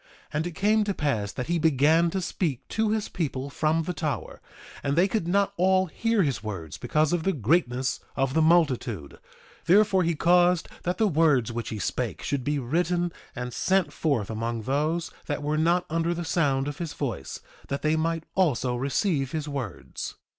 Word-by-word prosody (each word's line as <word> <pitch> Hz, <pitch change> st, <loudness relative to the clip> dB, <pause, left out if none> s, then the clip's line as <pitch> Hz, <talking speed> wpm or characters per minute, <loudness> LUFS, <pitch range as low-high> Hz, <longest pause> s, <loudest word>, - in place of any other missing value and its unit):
2:8 -, -, -29 dB, 0.3 s
And 155 Hz, +3 st, 0 dB
it -, -, -5 dB
came 215 Hz, +3 st, +3 dB
to 200 Hz, -, 0 dB
pass 110 Hz, -9 st, -1 dB
that 125 Hz, -, -4 dB
he 170 Hz, 0 st, 0 dB
began 160 Hz, +2 st, +4 dB
to 190 Hz, +3 st, -2 dB
speak 160 Hz, -7 st, -2 dB
to 220 Hz, -1 st, 0 dB
his 215 Hz, -1 st, 0 dB
people 140 Hz, -4 st, -3 dB
from 160 Hz, +2 st, +1 dB
the 180 Hz, -, -3 dB
tower; 145 Hz, -, -4 dB, 0.4 s
and 140 Hz, 0 st, 0 dB
they 175 Hz, +4 st, +4 dB
could 200 Hz, -4 st, -1 dB
not 200 Hz, +2 st, +2 dB
all 185 Hz, +1 st, +3 dB
hear 225 Hz, +4 st, +1 dB
his 135 Hz, -7 st, -1 dB
words 85 Hz, -8 st, -6 dB
because 155 Hz, +1 st, +1 dB
of 175 Hz, -, +1 dB
the 195 Hz, -, +1 dB
greatness 130 Hz, -, +1 dB, 0.2 s
of 135 Hz, -1 st, 0 dB
the 160 Hz, -, +3 dB
multitude; 135 Hz, -, +1 dB, 0.5 s
therefore 195 Hz, +1 st, +5 dB
he 170 Hz, -1 st, +1 dB
caused 175 Hz, +1 st, +3 dB
that 180 Hz, 0 st, -2 dB
the 220 Hz, -, +3 dB
words 150 Hz, -, +3 dB
which 120 Hz, 0 st, -4 dB
he 110 Hz, -, -4 dB
spake 100 Hz, -, -3 dB
should 140 Hz, -3 st, -1 dB
be 145 Hz, +3 st, 0 dB
written 175 Hz, +6 st, 0 dB, 0.2 s
and 125 Hz, -1 st, -5 dB
sent 190 Hz, -2 st, +1 dB
forth 135 Hz, -10 st, 0 dB
among 115 Hz, +1 st, -3 dB
those 155 Hz, +7 st, -1 dB, 0.2 s
that 145 Hz, -1 st, -2 dB
were 150 Hz, +1 st, 0 dB
not 170 Hz, +3 st, +2 dB
under 165 Hz, +1 st, 0 dB
the 175 Hz, 0 st, -4 dB
sound 140 Hz, -5 st, +1 dB
of 145 Hz, 0 st, -5 dB
his 170 Hz, -3 st, -4 dB
voice, 115 Hz, -, -4 dB, 0.3 s
that 140 Hz, 0 st, -3 dB
they 155 Hz, +1 st, +3 dB
might 165 Hz, 0 st, -1 dB
also 130 Hz, -9 st, +2 dB
receive 135 Hz, -, 0 dB
his 155 Hz, -1 st, -2 dB
words. 135 Hz, -9 st, -5 dB
155 Hz, 190 wpm, -26 LUFS, 135-175 Hz, 0.5 s, therefore